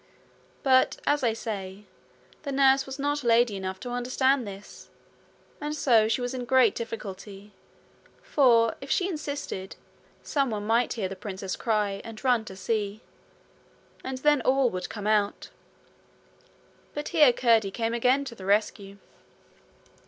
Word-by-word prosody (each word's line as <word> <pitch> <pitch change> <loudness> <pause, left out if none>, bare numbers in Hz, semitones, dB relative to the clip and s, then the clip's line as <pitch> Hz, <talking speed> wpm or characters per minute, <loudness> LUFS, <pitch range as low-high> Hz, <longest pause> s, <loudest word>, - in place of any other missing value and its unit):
But, 260 -1 +4
as 290 0 +2
I 230 -2 +2
say, 205 -3 -6 0.6
the 285 - -5
nurse 270 0 +3
was 265 0 -6
not 290 0 -1
lady 235 -2 +3
enough 190 -1 -5
to 245 - -6
understand 255 +1 +1
this, 200 +1 -11 0.7
and 300 +1 -3
so 230 -7 +4
she 220 +2 0
was 245 +1 -3
in 255 - -4
a - - -5
great 250 -3 +4
difficulty, 205 -2 -7 0.7
for, 235 -5 +4
if 275 - -9
she 365 - +1
insisted, 285 - -5 0.5
someone 240 -8 -1
might 230 +3 +2
hear 215 -5 -2
the 195 - -7
princess 190 -1 -5
cry 210 -3 -1
and 225 +1 -10
run 245 -4 +2
to 190 - -9
see, 210 +1 -2 1.0
and 265 0 -4
then 295 0 +3
all 260 -1 +2
would 180 -1 -5
come 205 -2 -7
out. 210 -1 0 1.4
But 295 0 -4
here 300 -6 +6
Curdie 230 -4 +3
came 225 +3 -2
again 250 +4 +2
to 250 - -7
the 195 -5 -11
rescue. 200 -1 0
230 Hz, 145 wpm, -27 LUFS, 205-265 Hz, 1.4 s, here